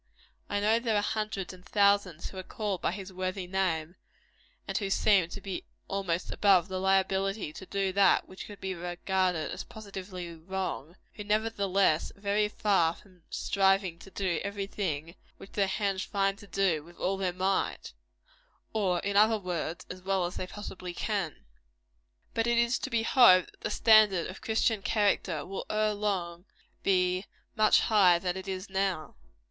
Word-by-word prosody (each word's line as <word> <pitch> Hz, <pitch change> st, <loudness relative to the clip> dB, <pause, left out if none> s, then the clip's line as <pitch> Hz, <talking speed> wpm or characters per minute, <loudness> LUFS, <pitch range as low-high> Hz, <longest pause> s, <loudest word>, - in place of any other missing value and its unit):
I 205 Hz, -, 0 dB
know 215 Hz, +3 st, +3 dB
there 230 Hz, -2 st, 0 dB
are 205 Hz, -, +3 dB
hundreds 215 Hz, -4 st, -2 dB
and 180 Hz, 0 st, -14 dB
thousands 200 Hz, -5 st, +2 dB
who 190 Hz, -, -11 dB
are -, -, -3 dB
called 200 Hz, 0 st, -4 dB
by -, -, +1 dB
his 190 Hz, 0 st, -7 dB
worthy 185 Hz, +1 st, -3 dB
name, 180 Hz, -2 st, -1 dB, 0.7 s
and -, -, -4 dB
who 200 Hz, -2 st, 0 dB
seem 195 Hz, -3 st, +3 dB
to 200 Hz, -, -7 dB
be 195 Hz, -1 st, -5 dB, 0.2 s
almost 185 Hz, -3 st, -2 dB
above 190 Hz, -3 st, +4 dB
the 185 Hz, 0 st, -3 dB
liability 190 Hz, -1 st, +1 dB
to 190 Hz, -, -10 dB
do 195 Hz, -1 st, -1 dB
that 195 Hz, -1 st, +4 dB
which 185 Hz, -, -9 dB
could 205 Hz, -2 st, -11 dB
be 190 Hz, 0 st, -3 dB
regarded 180 Hz, -1 st, -1 dB
as -, -, -5 dB
positively 190 Hz, -4 st, -8 dB
wrong, 175 Hz, -2 st, -5 dB, 0.2 s
who, 210 Hz, -, -7 dB
nevertheless, 200 Hz, -5 st, +1 dB
are -, -, -20 dB
very 205 Hz, +1 st, +1 dB
far 190 Hz, -6 st, +2 dB
from 185 Hz, -3 st, -20 dB
striving 195 Hz, -3 st, +1 dB
to -, -, -13 dB
do 185 Hz, -4 st, -1 dB
everything 195 Hz, -6 st, -3 dB, 0.2 s
which 195 Hz, -, -13 dB
their 200 Hz, -2 st, +1 dB
hands 195 Hz, -1 st, -1 dB
find 195 Hz, -1 st, 0 dB
to 205 Hz, -, -13 dB
do 190 Hz, -7 st, +1 dB
with 170 Hz, +2 st, -16 dB
all 190 Hz, +2 st, 0 dB
their 190 Hz, -2 st, 0 dB
might 185 Hz, +2 st, -1 dB, 0.8 s
or, 190 Hz, -5 st, +1 dB
in 200 Hz, 0 st, -2 dB
other 215 Hz, +2 st, +5 dB
words, 175 Hz, -4 st, -4 dB
as 185 Hz, 0 st, -8 dB
well 190 Hz, -1 st, 0 dB
as 175 Hz, -, -5 dB
they 185 Hz, -, -4 dB
possibly 185 Hz, -3 st, -7 dB
can. 195 Hz, -7 st, -3 dB, 0.9 s
But 225 Hz, 0 st, 0 dB
it 235 Hz, 0 st, +2 dB
is 235 Hz, +1 st, +2 dB
to -, -, -4 dB
be 230 Hz, -2 st, +1 dB
hoped 205 Hz, -8 st, +6 dB
that -, -, -27 dB
the -, -, -2 dB
standard 215 Hz, -6 st, +5 dB
of 185 Hz, -, -12 dB
Christian 220 Hz, -1 st, +1 dB
character 195 Hz, -7 st, +1 dB
will 195 Hz, +1 st, -6 dB
ere 215 Hz, 0 st, +1 dB
long 185 Hz, -4 st, -2 dB, 0.4 s
be 185 Hz, 0 st, +1 dB, 0.3 s
much 215 Hz, -1 st, +5 dB
higher 190 Hz, -5 st, +5 dB
than 180 Hz, +1 st, -2 dB
it 190 Hz, +1 st, -7 dB
is 190 Hz, +1 st, -4 dB
now. 190 Hz, -5 st, -1 dB
195 Hz, 175 wpm, -29 LUFS, 180-205 Hz, 0.9 s, hoped